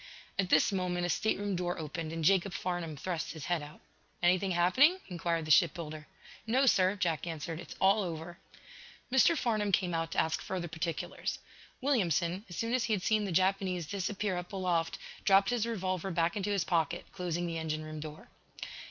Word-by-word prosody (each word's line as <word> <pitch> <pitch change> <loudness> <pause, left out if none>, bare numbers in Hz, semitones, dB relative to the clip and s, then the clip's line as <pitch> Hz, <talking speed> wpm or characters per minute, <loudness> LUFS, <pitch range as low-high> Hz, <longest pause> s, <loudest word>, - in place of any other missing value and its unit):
At 190 -2 +1
this - - +4
moment 180 -2 -1
a - - -1
stateroom 205 +1 0
door 175 0 -2
opened 160 0 -4
and 165 0 -4
Jacob 190 +2 +3
Farnum 175 -4 -3
thrust 170 +2 -3
his 160 -4 -7
head 175 -3 0
out. 145 +1 -11 0.4
"Anything 185 +2 +3
happening?" 185 - +4
inquired 170 -2 -1
the 155 - -1
ship 160 +2 +5
builder. 155 -2 -7 0.4
"No, 260 +5 +3
sir," 190 -5 +4
Jack 175 -4 -1
answered. 165 0 -4
"It's 175 - -9
all 195 +3 +4
over." 170 -1 -5 0.7
Mr. 265 +6 +5
Farnum 215 -5 0
came 180 -2 +2
out, 165 0 -1
to - - -6
ask 160 - +1
further 180 -2 -3
particulars. 165 +1 -3 0.4
Williamson, 190 - +1
as 175 - -8
soon 230 +1 -1
as 255 -2 +2
he 225 - +1
had 190 -4 -1
seen 215 0 +2
the 195 - -3
Japanese 185 -1 +1
disappear 200 +1 -2
up 180 +2 -6
aloft, 180 -4 0 0.3
dropped 195 +1 +5
his 235 -2 0
revolver 185 -4 -2
back 170 -1 +1
into 205 0 -2
his 200 -3 +1
pocket, 170 0 0
closing 175 -1 -2
the 165 -1 -3
engine 155 -1 -3
room 155 0 -7
door. 155 0 -9
180 Hz, 185 wpm, -31 LUFS, 165-195 Hz, 0.7 s, ship